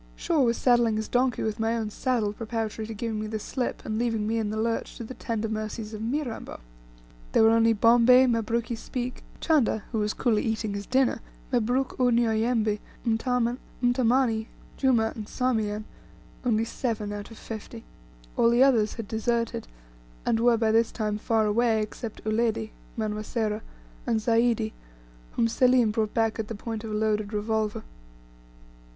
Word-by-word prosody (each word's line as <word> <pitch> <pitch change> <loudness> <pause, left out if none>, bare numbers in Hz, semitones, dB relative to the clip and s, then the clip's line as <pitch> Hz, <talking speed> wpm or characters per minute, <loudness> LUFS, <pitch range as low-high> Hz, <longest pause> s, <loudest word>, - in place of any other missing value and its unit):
Shaw 315 - +1
was 235 -2 +2
saddling 240 -3 +3
his 220 0 -2
donkey 250 0 +1
with 220 -1 -2
my 225 +1 +1
own 220 -2 -3
saddle, 225 -4 0
preparatory 220 -1 -4
to 225 - -5
giving 220 0 -3
me 215 - -3
the 220 0 -3
slip, 245 +4 -4
and 215 0 -2
leaving 225 -3 0
me 225 +1 0
in 215 -2 -1
the 215 - -3
lurch 225 +1 -2
to - - -6
the 230 - -7
tender 225 -3 -3
mercies 215 0 -4
of 215 - -6
Mirambo. 245 +1 -3 0.7
There - - +5
were 220 - +6
only 230 0 +4
Bombay, 240 +4 +6
Mabruki 230 0 0
Speke, 250 +2 -5 0.2
Chanda 275 -9 +2
who 225 - -1
was 210 0 -1
coolly 225 -4 +2
eating 220 -2 -2
his 200 0 -5
dinner, 260 -3 +2 0.3
Mabruk 250 +3 0
Unyauyembe, 230 -3 +2 0.3
Mtamani, 245 0 +1 0.3
Juma, 235 -5 +2
and 215 -2 -6
Sarmean 215 -4 -1 0.6
only 225 -3 +2
seven 220 -3 -3
out 205 0 -6
of 225 - -12
fifty. 220 -2 -8 0.5
All 230 - +4
the 240 +2 +5
others 230 -6 +3
had 230 -3 -6
deserted, 230 - -1 0.6
and 225 - +2
were 235 0 +4
by 220 -1 +2
this 225 +1 +3
time 210 -2 -2
far 220 0 +1
away, 225 +1 +2
except 215 +1 -5
Uledi 220 0 0 0.3
(Manwa 215 -1 -2
Sera) 215 -1 -2 0.5
and 225 - +2
Zaidi, 225 -1 +2 0.6
whom 230 - +2
Selim 250 -1 +4
brought 215 0 -1
back 225 -1 +1
at 220 - -2
the 225 - -5
point 225 +1 -5
of 225 - -5
a - - -4
loaded 215 -1 0
revolver. 215 0 -1
225 Hz, 165 wpm, -27 LUFS, 215-240 Hz, 0.7 s, were